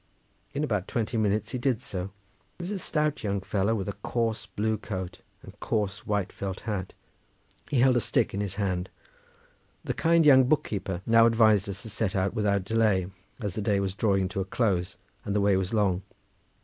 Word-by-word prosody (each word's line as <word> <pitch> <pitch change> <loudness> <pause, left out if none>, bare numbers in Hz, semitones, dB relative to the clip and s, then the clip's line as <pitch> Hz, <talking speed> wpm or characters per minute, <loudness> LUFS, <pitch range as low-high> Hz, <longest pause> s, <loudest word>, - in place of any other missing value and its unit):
In 145 - 0
about 105 -10 -1
twenty 115 0 -2
minutes 105 -1 +1
he 125 - -3
did 125 -3 +1
so. 90 -3 -5 0.5
He 175 - -7
was 180 - -4
a 200 - -2
stout 150 -5 -1
young 100 -1 0
fellow 100 +3 0
with 95 -4 -3
a 100 - -2
coarse 110 +1 -2
blue 110 +2 -1
coat, 95 -3 -5 0.2
and - - -13
coarse 105 -2 -2
white 100 -2 -1
felt 95 -1 -5
hat; 100 -4 -4 0.8
he 130 - +2
held 130 -1 +5
a 120 - +3
stick - - +1
in 100 - -1
his 100 -2 -3
hand. 95 -3 -1 0.9
The - - -2
kind 165 -1 +3
young 130 -3 +7
book 145 +3 +2
keeper 95 -3 -4
now 115 0 +6
advised 110 -3 +4
us 100 +1 -6
to 110 - -7
set 105 -1 -1
out 95 0 +1
without 100 -3 +1
delay 100 -4 +2 0.3
as 105 -6 -3
the 110 - -3
day 100 -1 +1
was 95 -1 -1
drawing 95 -2 +1
to 95 0 -2
a - - -2
close, 95 -4 0 0.3
and 100 - -2
the 105 - +3
way 100 -1 +4
was 95 0 -1
long. 100 -5 +2
105 Hz, 200 wpm, -27 LUFS, 95-115 Hz, 0.9 s, young